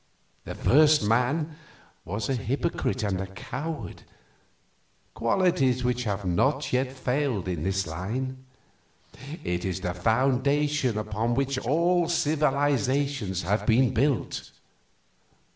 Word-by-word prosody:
The -, -, -6 dB
first 150 Hz, 0 st, +5 dB
man 140 Hz, +8 st, +1 dB, 0.5 s
was 105 Hz, +4 st, -3 dB
a 135 Hz, -, 0 dB
hypocrite 130 Hz, +1 st, -1 dB
and 95 Hz, -3 st, -1 dB
a 95 Hz, -, -4 dB
coward, 150 Hz, +11 st, -6 dB, 1.1 s
qualities 130 Hz, +1 st, +2 dB
which 125 Hz, 0 st, 0 dB
have 100 Hz, -2 st, -2 dB
not 135 Hz, +13 st, +1 dB
yet 130 Hz, +1 st, +1 dB
failed 130 Hz, -6 st, -1 dB
in 85 Hz, -4 st, -2 dB
his 95 Hz, 0 st, 0 dB
line; 125 Hz, +11 st, -4 dB, 1.0 s
it 90 Hz, 0 st, -2 dB
is 95 Hz, 0 st, -3 dB
the 90 Hz, -1 st, -2 dB
foundation 130 Hz, +5 st, +1 dB
upon 110 Hz, +2 st, -1 dB
which 135 Hz, 0 st, 0 dB
all 170 Hz, +6 st, +2 dB
civilizations 140 Hz, -, +1 dB
have 100 Hz, +3 st, -1 dB
been 120 Hz, +2 st, +4 dB
built. 135 Hz, +2 st, 0 dB
125 Hz, 110 wpm, -26 LUFS, 105-145 Hz, 1.1 s, first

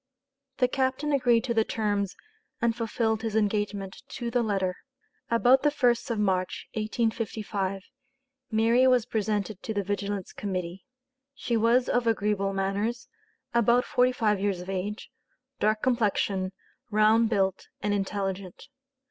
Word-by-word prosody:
The 250 Hz, -, +3 dB
captain 265 Hz, +3 st, 0 dB
agreed 245 Hz, -4 st, +3 dB
to 245 Hz, -2 st, -1 dB
the 225 Hz, -1 st, +3 dB
terms 205 Hz, -3 st, -1 dB, 0.4 s
and 230 Hz, -1 st, +1 dB
fulfilled 225 Hz, -1 st, -1 dB
his 225 Hz, -2 st, -3 dB
engagement 205 Hz, -2 st, -1 dB
to 240 Hz, -2 st, -5 dB
the 245 Hz, -, +2 dB
letter. 195 Hz, -5 st, -1 dB, 0.5 s
About 245 Hz, +3 st, +5 dB
the 295 Hz, -, +4 dB
1st 250 Hz, -4 st, +1 dB
of 230 Hz, -, -1 dB
March, 190 Hz, -3 st, -1 dB
1855, 215 Hz, -3 st, -2 dB, 0.7 s
Mary 230 Hz, +3 st, +4 dB
was 250 Hz, -3 st, +4 dB
presented 210 Hz, -3 st, -2 dB
to 220 Hz, -, -4 dB
the 200 Hz, -, 0 dB
Vigilance 200 Hz, -1 st, -3 dB
Committee. 185 Hz, -1 st, -4 dB, 0.5 s
She 240 Hz, -3 st, -2 dB
was 230 Hz, +3 st, +3 dB
of 245 Hz, -1 st, +1 dB
agreeable 210 Hz, -3 st, +1 dB
manners, 200 Hz, +5 st, -2 dB, 0.4 s
about 235 Hz, +1 st, +4 dB
forty 250 Hz, 0 st, +3 dB
five 215 Hz, -5 st, +1 dB
years 195 Hz, -2 st, 0 dB
of 180 Hz, +2 st, -6 dB
age, 200 Hz, +3 st, -4 dB, 0.5 s
dark 215 Hz, +1 st, +1 dB
complexion, 205 Hz, -6 st, +1 dB, 0.4 s
round 215 Hz, +1 st, +4 dB
built, 195 Hz, -4 st, 0 dB
and 205 Hz, 0 st, 0 dB
intelligent. 195 Hz, +2 st, -3 dB
215 Hz, 135 wpm, -27 LUFS, 200-235 Hz, 0.7 s, About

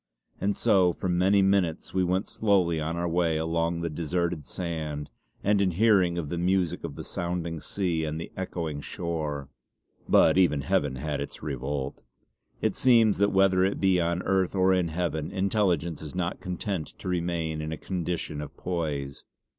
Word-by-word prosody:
And 100 Hz, +1 st, 0 dB
so 90 Hz, -3 st, +4 dB
for 95 Hz, -, -4 dB
many 95 Hz, +3 st, +4 dB
minutes 95 Hz, -4 st, +1 dB
we 95 Hz, -, +2 dB
went 90 Hz, +3 st, 0 dB
slowly 95 Hz, -6 st, +2 dB
on 80 Hz, +2 st, -2 dB
our 85 Hz, 0 st, -1 dB
way 85 Hz, -1 st, +1 dB
along 85 Hz, +1 st, 0 dB
the 85 Hz, -, -1 dB
deserted 85 Hz, -1 st, -2 dB
sand, 80 Hz, -2 st, -4 dB, 0.3 s
and 100 Hz, 0 st, +3 dB
in 95 Hz, -, +3 dB
hearing 95 Hz, -2 st, +3 dB
of 80 Hz, -4 st, -3 dB
the 85 Hz, -, -2 dB
music 90 Hz, -1 st, +1 dB
of 80 Hz, -4 st, -5 dB
the -, -, -6 dB
sounding 85 Hz, -1 st, -3 dB
sea 85 Hz, -4 st, -1 dB
and 80 Hz, 0 st, -3 dB
the 85 Hz, -, -7 dB
echoing 85 Hz, -5 st, -4 dB
shore. 75 Hz, -4 st, -4 dB, 0.6 s
But -, -, +5 dB
even 75 Hz, -6 st, +3 dB
Heaven 70 Hz, 0 st, 0 dB
had 70 Hz, +1 st, -3 dB
its 70 Hz, -, -7 dB
revolt. 70 Hz, 0 st, -3 dB, 0.6 s
It -, -, +1 dB
seems 115 Hz, -5 st, +4 dB
that 100 Hz, 0 st, +3 dB
whether 95 Hz, -1 st, +4 dB
it 95 Hz, +1 st, 0 dB
be 95 Hz, -2 st, +3 dB
on 85 Hz, +1 st, 0 dB
Earth 95 Hz, -1 st, +1 dB
or 95 Hz, 0 st, +4 dB
in 90 Hz, -2 st, +2 dB
Heaven 80 Hz, -2 st, -2 dB
intelligence 95 Hz, -5 st, 0 dB
is 80 Hz, +2 st, -8 dB
not 90 Hz, 0 st, -2 dB
content 90 Hz, -2 st, -4 dB
to -, -, -8 dB
remain 85 Hz, -3 st, -1 dB
in 75 Hz, +1 st, -4 dB
a 80 Hz, -, -3 dB
condition 85 Hz, -4 st, -3 dB
of 75 Hz, -, -9 dB
poise. 75 Hz, -6 st, -3 dB
85 Hz, 175 wpm, -27 LUFS, 80-95 Hz, 0.6 s, But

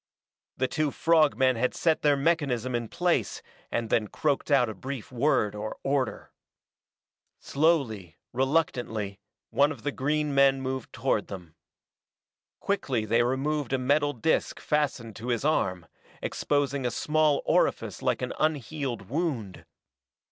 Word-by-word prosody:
The 130 Hz, -, +1 dB
two 155 Hz, +2 st, 0 dB
frog 155 Hz, 0 st, +3 dB
men 130 Hz, -2 st, +3 dB
had 125 Hz, +2 st, 0 dB
set 160 Hz, -2 st, +1 dB
their 145 Hz, -1 st, +3 dB
mechanism 135 Hz, -5 st, 0 dB
in 120 Hz, -1 st, -1 dB
place 175 Hz, +7 st, 0 dB, 0.3 s
and 115 Hz, -2 st, -2 dB
then 110 Hz, -2 st, +2 dB
croaked 145 Hz, +5 st, -1 dB
out 135 Hz, -4 st, +4 dB
a 110 Hz, -, -4 dB
brief 130 Hz, +4 st, -7 dB
word 120 Hz, -5 st, +1 dB
or 105 Hz, +1 st, -5 dB
order. 135 Hz, -1 st, -1 dB, 1.1 s
Slowly, 125 Hz, -, 0 dB, 0.2 s
reluctantly, 125 Hz, -7 st, -1 dB, 0.3 s
one 140 Hz, +6 st, +3 dB
of 135 Hz, -8 st, -9 dB
the 145 Hz, -, -1 dB
green 150 Hz, +2 st, -1 dB
men 135 Hz, -1 st, +4 dB
moved 130 Hz, -2 st, -4 dB
toward 115 Hz, -3 st, 0 dB
them. 90 Hz, -5 st, -9 dB, 1.1 s
Quickly 135 Hz, -, -1 dB
they 115 Hz, +2 st, +3 dB
removed 135 Hz, +2 st, -1 dB
a -, -, +3 dB
metal 145 Hz, +3 st, +2 dB
disk 145 Hz, +6 st, 0 dB
fastened 135 Hz, -7 st, -1 dB
to 115 Hz, +2 st, -7 dB
his 120 Hz, +1 st, -1 dB
arm, 95 Hz, -, +1 dB, 0.3 s
exposing 140 Hz, -2 st, -1 dB
a 125 Hz, -, +1 dB
small 150 Hz, +2 st, +1 dB
orifice -, -, +1 dB
like -, -, 0 dB
an -, -, -3 dB
unhealed 140 Hz, -7 st, -2 dB
wound. 115 Hz, -, -3 dB
135 Hz, 140 wpm, -27 LUFS, 115-150 Hz, 1.1 s, out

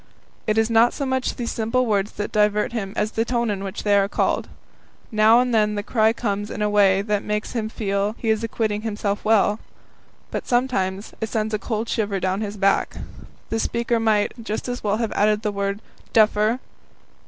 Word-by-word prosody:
It 215 Hz, 0 st, +1 dB
is 225 Hz, +1 st, +2 dB
not 230 Hz, +1 st, +5 dB
so 280 Hz, -, -2 dB
much 260 Hz, -1 st, -1 dB
these 235 Hz, -1 st, -3 dB
simple 230 Hz, +3 st, 0 dB
words 205 Hz, -2 st, 0 dB
that 205 Hz, -, -4 dB
divert 210 Hz, +2 st, +2 dB
him 200 Hz, -5 st, -3 dB
as 215 Hz, -, 0 dB
the 225 Hz, -, 0 dB
tone 235 Hz, -1 st, 0 dB
in 195 Hz, -1 st, -3 dB
which 195 Hz, 0 st, -5 dB
they 205 Hz, -1 st, +3 dB
are 200 Hz, -1 st, +3 dB
called. -, -, 0 dB, 0.6 s
Now 220 Hz, +2 st, +5 dB
and 250 Hz, -1 st, +1 dB
then 210 Hz, -1 st, +2 dB
the 205 Hz, -, -2 dB
cry 220 Hz, 0 st, +3 dB
comes 205 Hz, -3 st, -2 dB
in 210 Hz, -, -3 dB
a 210 Hz, -, +1 dB
way 195 Hz, -2 st, +4 dB
that 210 Hz, -1 st, 0 dB
makes 210 Hz, 0 st, -3 dB
him 220 Hz, -3 st, -2 dB
feel 200 Hz, -1 st, -1 dB
he 225 Hz, -, 0 dB
is 220 Hz, +1 st, 0 dB
acquitting 215 Hz, -2 st, -1 dB
himself 210 Hz, -2 st, -2 dB
well. 215 Hz, -1 st, +3 dB, 0.7 s
But -, -, -4 dB
sometimes 215 Hz, -6 st, 0 dB
it 220 Hz, -, -2 dB
sends 220 Hz, 0 st, -1 dB
a 215 Hz, -, 0 dB
cold 220 Hz, +2 st, -3 dB
shiver 205 Hz, -4 st, -1 dB
down 190 Hz, +2 st, -1 dB
his 210 Hz, -1 st, -4 dB
back; 195 Hz, 0 st, +2 dB, 0.6 s
the 225 Hz, -, 0 dB
speaker 235 Hz, +1 st, 0 dB
might 215 Hz, -2 st, +2 dB
just 220 Hz, +2 st, -4 dB
as 245 Hz, 0 st, -4 dB
well 205 Hz, 0 st, +1 dB
have 230 Hz, -1 st, -2 dB
added 210 Hz, +1 st, +2 dB
the 210 Hz, -, 0 dB
word 200 Hz, +1 st, -3 dB, 0.3 s
"Duffer!" 215 Hz, +2 st, +3 dB
215 Hz, 200 wpm, -23 LUFS, 205-225 Hz, 0.7 s, not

